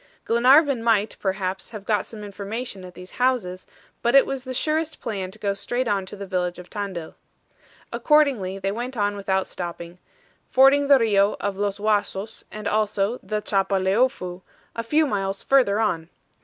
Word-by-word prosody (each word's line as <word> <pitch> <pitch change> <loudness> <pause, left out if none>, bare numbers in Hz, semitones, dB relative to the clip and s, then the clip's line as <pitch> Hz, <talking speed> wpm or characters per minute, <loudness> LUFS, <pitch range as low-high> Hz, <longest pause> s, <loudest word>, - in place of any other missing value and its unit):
Glenarvan 260 +3 +5
might, 220 -2 +2
perhaps, 190 -1 -2
have 215 -3 -9
got 210 -2 0
some 215 -2 -9
information 205 +1 -6
at 180 -1 -11
these 180 +1 -11
houses, 220 -8 0 0.3
but 235 +3 +2
it 275 - +8
was 270 -2 -4
the 260 - -5
surest 315 +3 -1
plan 195 -5 -4
to 195 - -12
go 200 -2 -1
straight 240 +6 -2
on 195 -3 0
to 205 - -7
the 200 0 -7
village 180 -2 -2
of 180 0 -12
Tandil. 195 -6 -5 0.8
Accordingly 270 -12 +2
they 195 0 -2
went 245 +4 -5
on 205 -1 +1
without 190 -1 0
stopping, 170 0 -7 0.5
fording 275 +2 +5
the 280 -1 +7
RIO 205 -4 +2
of 200 -1 -2
Los 205 -1 -1
Huasos 210 0 -1
and 210 -1 -5
also 210 +2 0
the 210 +2 -3
Chapaleofu, 195 0 +1 0.3
a 230 - -1
few 300 +7 +2
miles 195 -6 -2
further 245 -7 +3
on. 170 -7 0
205 Hz, 170 wpm, -24 LUFS, 195-240 Hz, 0.8 s, it